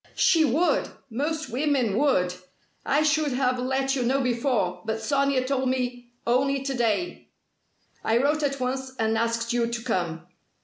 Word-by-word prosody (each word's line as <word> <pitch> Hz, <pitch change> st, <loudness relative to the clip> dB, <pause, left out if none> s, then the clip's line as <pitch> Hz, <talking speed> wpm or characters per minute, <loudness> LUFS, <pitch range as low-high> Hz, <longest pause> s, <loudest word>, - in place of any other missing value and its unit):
"She 330 Hz, -4 st, +4 dB
would! 310 Hz, +6 st, +2 dB, 0.2 s
Most 305 Hz, +5 st, -2 dB
women 255 Hz, -5 st, +1 dB
would. 215 Hz, -9 st, +2 dB, 0.5 s
I 295 Hz, +3 st, +2 dB
should 305 Hz, -2 st, +2 dB
have 250 Hz, -1 st, +1 dB
let 265 Hz, +2 st, 0 dB
you 260 Hz, -, -1 dB
know 255 Hz, +3 st, +1 dB
before, 235 Hz, -8 st, 0 dB
but 220 Hz, 0 st, -2 dB
Sonia 275 Hz, +2 st, +1 dB
told 260 Hz, -1 st, 0 dB
me 245 Hz, -1 st, -2 dB, 0.2 s
only 270 Hz, +3 st, +1 dB
to 270 Hz, 0 st, -2 dB
day. 240 Hz, +7 st, -1 dB, 0.7 s
I 225 Hz, -, +2 dB
wrote 295 Hz, +5 st, +2 dB
at 275 Hz, -2 st, -1 dB
once 260 Hz, +1 st, -3 dB
and 220 Hz, 0 st, +1 dB
asked 230 Hz, +1 st, 0 dB
you 235 Hz, -1 st, +1 dB
to 235 Hz, 0 st, -4 dB
come." 170 Hz, -8 st, -2 dB
255 Hz, 160 wpm, -25 LUFS, 230-275 Hz, 0.7 s, She